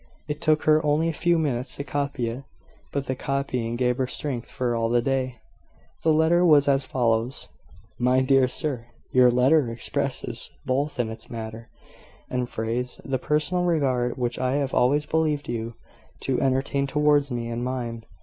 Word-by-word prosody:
It 150 -1 -4
took 155 -1 +3
her 155 0 +4
only 150 +2 +2
a - - -2
few 170 +2 +2
minutes 130 -5 0
to 140 - -4
copy 140 -3 -2
it; 120 +4 -5 0.5
but 140 -1 -2
the 130 - -2
copying 130 -4 -2
gave 125 0 +1
her 130 - +1
strength 130 -2 -4
for 125 -3 -1
all 115 0 0
the 120 +1 +3
day. 130 0 -1 0.7
The 160 - +3
letter 160 +3 +4
was 150 -4 +6
as 135 -1 +3
follows: 120 0 0 0.5
"My 125 +1 +3
Dear 130 0 +4
Sir 125 -2 -3 0.2
Your 125 -1 +6
letter 125 +2 +4
expresses, 115 +1 -2 0.2
both 140 +2 -1
in 115 -2 0
its 115 - -10
matter 115 0 -7 0.6
and 125 -1 -1
phrase, 120 +3 -3
the 135 -1 -1
personal 150 +6 +1
regard 135 -8 +1
which 120 -1 -2
I 130 0 0
have 140 -2 -1
always 145 +4 +3
believed 155 -2 0
you 115 -1 -4 0.5
to 130 -2 0
entertain 135 +1 +1
towards 145 0 +3
me 120 -2 -3
and 120 +1 -3
mine. 120 -3 -3
130 Hz, 170 wpm, -25 LUFS, 120-145 Hz, 0.7 s, was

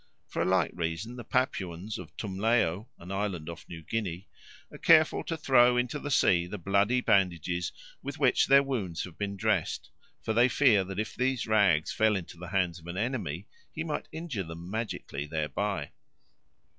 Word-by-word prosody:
For - - -3
a - - +2
like 95 -3 +2
reason 85 +7 -3
the 120 - -7
Papuans 100 -5 -2
of - - -11
Tumleo, 105 0 0
an 90 +2 -10
island 95 -5 -2
off 85 - -9
New 80 -2 -8
Guinea, 100 -2 -3 0.4
are - - -11
careful 155 -1 +5
to 165 - -3
throw 125 -4 +5
into 125 +4 -1
the 145 - -5
sea 90 -9 +3
the 105 - -5
bloody 100 +7 +2
bandages 90 -4 +1 0.3
with - - -6
which - - +3
their 140 +1 +7
wounds 105 -12 -2
have 90 -3 -9
been 100 +1 -4
dressed, - - -1 0.3
for 110 - -1
they 120 +3 +5
fear 110 -5 +4
that 95 +1 -5
if 110 - -3
these 130 -2 0
rags 100 -8 +3
fell 110 -1 +3
into 90 -2 -5
the 90 +1 -8
hands 90 -3 0
of 80 - -15
an 85 +1 -5
enemy 105 - -2 0.3
he 160 - -4
might 155 -2 -3
injure 160 -9 -4
them 85 +1 -8
magically 105 -10 -4
thereby. 80 +2 -2
100 Hz, 180 wpm, -29 LUFS, 85-120 Hz, 0.4 s, their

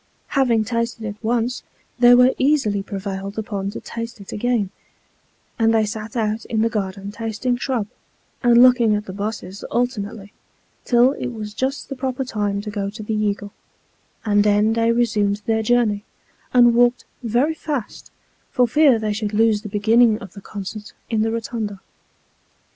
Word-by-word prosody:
Having 245 -5 +2
tasted 230 0 -2
it 205 -1 -4
once, 235 +2 -1 0.4
they 245 0 +8
were 250 +1 +5
easily 260 -8 +2
prevailed 195 0 -5
upon 205 -3 -3
to 205 - -6
taste 230 0 -7
it 200 - -10
again; 220 -3 0 0.9
and 225 0 +3
they 220 -1 +3
sat 215 +1 -6
out 220 0 -1
in 220 -2 0
the 230 - +2
garden 195 -2 -3
tasting 225 +3 -2
shrub, 245 -3 -2 0.6
and 240 -1 +6
looking 245 -4 +5
at 210 0 -3
the 185 - -7
busses 200 -1 -5
alternately, 220 -4 -3 0.5
till 245 +1 +4
it 280 - -4
was 215 -4 -6
just 265 +5 -2
the 275 - -5
proper 260 0 -3
time 205 -4 -2
to 210 0 -6
go 200 -1 -2
to 215 +2 -8
the 220 - -3
Eagle; 205 -1 -1 0.7
and 205 -1 +3
then 210 +1 +3
they 230 0 +2
resumed 210 -3 +1
their 220 -1 +1
journey, 220 -3 +1 0.5
and 240 -1 +6
walked 245 +1 +3 0.2
very 245 +6 +1
fast, 295 -7 -5 0.4
for 250 -1 +2
fear 280 0 +5
they 215 -1 -1
should 210 0 -3
lose 220 -1 +3
the 210 - -7
beginning 220 +2 +4
of 200 -5 -11
the 200 - -11
concert 205 +2 -7 0.2
in 220 -1 +1
the 225 - +1
Kotunda. 225 -3 -4
220 Hz, 165 wpm, -21 LUFS, 205-240 Hz, 0.9 s, they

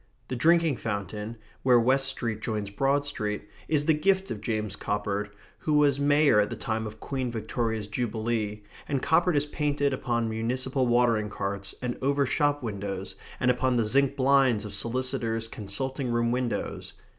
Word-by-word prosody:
The 130 - -2
drinking 165 +1 +3
fountain, 105 +1 -4 0.2
where 125 -2 +5
West 135 +3 +3
Street 115 -5 -1
joins 105 -3 -3
Broad 135 +6 +1
Street, 105 -7 -3 0.2
is 150 -2 +1
the 160 - +5
gift 190 +5 +1
of 105 - -4
James 105 -3 -2
Coppard, 105 0 -2 0.3
who 155 - -1
was 145 -2 +4
mayor 145 -4 +4
at 105 - +2
the - - -4
time 110 0 -2
of 110 +1 -10
Queen 130 -1 -3
Victoria's 110 -1 -2
jubilee, 110 -1 -2 0.2
and 140 -3 -1
Coppard 170 +2 +3
is 145 0 +3
painted 145 -1 0
upon 120 -3 -1
municipal 125 +4 -1
watering 120 -3 +3
carts 100 -1 -4
and 125 -1 -3
over 140 +1 +2
shop 145 +1 +1
windows, 100 -3 -4 0.3
and 125 0 +4
upon 125 0 +1
the 115 -2 +2
zinc 140 +5 +3
blinds 130 -5 +3
of 105 - -6
solicitors' 115 -2 -1
consulting 130 +6 -4
room 120 0 +1
windows. 125 -1 -2
120 Hz, 165 wpm, -27 LUFS, 110-140 Hz, 0.3 s, where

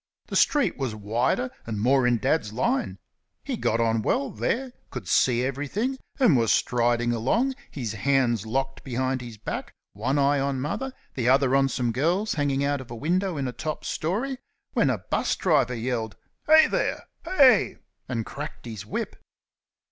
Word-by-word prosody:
The - - -4
street 295 -2 +3
was 130 -5 -2
wider, 115 +4 0 0.2
and 110 -2 -3
more 130 +3 +3
in 120 -1 +3
Dad's 130 -3 0
line. 245 - -1 0.5
He 270 - -3
got 115 - 0
on 115 -1 +2
well 140 +5 0
there, 245 - -1 0.2
could 120 -8 -7
see 120 +5 +3
everything, 170 - -2 0.2
and 240 - +5
was 115 -3 +3
striding 120 0 +2
along, 230 - +1 0.2
his 120 -7 -4
hands 120 -1 +1
locked 135 +4 -2
behind 130 0 -1
his 120 -3 -9
back, 105 - -5 0.2
one 140 - -1
eye 140 0 +3
on 135 -1 -1
Mother, 210 - -3 0.2
the 125 -2 0
other 135 0 +4
on 135 0 +3
some 125 -3 -1
girls 175 - +1
hanging 140 -2 0
out 140 -1 0
of 130 - -12
a 120 - -6
window 175 - 0
in 135 -2 -1
a - - -2
top 155 +3 -5
storey, 240 - -2 0.3
when - - +3
a - - +1
'bus - - -1
driver 140 -8 +2
yelled 115 -2 -2 0.3
"Heigh 315 +1 +8
there! - - -1 0.2
heigh!" 275 - +4 0.3
and 115 -4 -2
cracked 145 -1 -7
his 110 -5 -7
whip. - - -4
135 Hz, 170 wpm, -26 LUFS, 120-160 Hz, 0.5 s, Heigh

